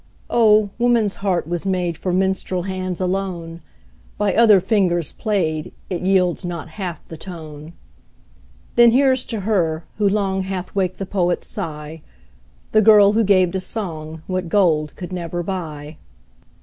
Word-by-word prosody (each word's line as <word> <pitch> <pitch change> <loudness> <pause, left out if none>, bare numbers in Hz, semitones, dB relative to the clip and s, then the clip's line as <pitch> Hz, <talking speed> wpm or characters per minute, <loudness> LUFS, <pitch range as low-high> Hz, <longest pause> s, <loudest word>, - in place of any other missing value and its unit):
Oh! 215 -3 +4
woman's 235 -4 +2
heart 190 -5 0
was 170 +1 -3
made 180 -3 -1
For 180 +3 -3
minstrel 190 -1 0
hands 185 -1 -4
alone; 180 -3 -3 0.6
By 205 -2 +1
other 215 -4 +6
fingers 180 -5 +1
played, 165 -8 -2 0.2
It 180 - -2
yields 185 -2 +2
not 175 -3 -5
half 175 -2 -6
the 160 - -9
tone. 155 -2 -9 1.0
Then 240 0 +7
here's 260 +1 +3
to 225 -4 -4
her, 175 -6 0 0.2
who 205 -1 +3
long 195 -2 0
Hath 185 -1 -5
waked 185 -2 -1
the 195 - -4
poet's 180 -2 -1
sigh, 150 0 -6 0.7
The 215 - +5
girl 210 -2 +7
who 225 +1 +3
gave 185 -3 +3
to 190 - -2
song 160 -6 -6
What 185 -2 -3
gold 160 -6 +2
could 180 0 -7
never 175 -1 -4
buy. 155 -5 -6
185 Hz, 150 wpm, -20 LUFS, 170-200 Hz, 1.0 s, Then